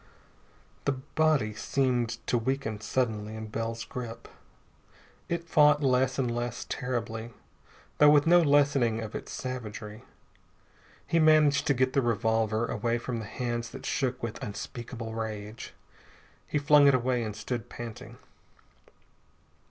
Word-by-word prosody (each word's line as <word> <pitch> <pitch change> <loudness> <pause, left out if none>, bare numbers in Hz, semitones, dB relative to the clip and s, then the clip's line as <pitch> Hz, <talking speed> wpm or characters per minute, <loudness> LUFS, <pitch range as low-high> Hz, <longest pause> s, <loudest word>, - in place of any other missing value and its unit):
The 140 - +2
body 140 -3 +1
seemed 120 0 0
to - - 0
weaken 115 -3 -2
suddenly 110 -3 -1
in 110 0 -6
Bell's 115 +1 -3
grip. 120 -2 -7 1.0
It 170 0 -2
fought 150 -2 +5
less 130 -1 +2
and 125 -3 0
less 120 0 -3
terribly, 120 -3 -4 0.6
though 150 - +8
with 145 -1 +5
no 175 +1 +6
lessening 140 -6 +3
of 110 -1 -6
its - - -6
savagery. 110 -4 -6 1.0
He 165 - +1
managed 155 -2 +5
to 140 - +3
get 130 +1 +1
the 135 - +3
revolver 110 -1 +1
away 115 +1 -1
from 120 0 -4
the 110 - -6
hands 120 +1 -3
that - - -9
shook 130 -3 -1
with 115 -2 -4
unspeakable 115 +2 -6
rage. 110 -1 -5 0.8
He - - -1
flung 145 0 +6
it 140 - +6
away 125 0 +1
and 110 -2 -4
stood 115 +1 -4
panting. 115 -2 -8
120 Hz, 135 wpm, -28 LUFS, 115-140 Hz, 1.0 s, though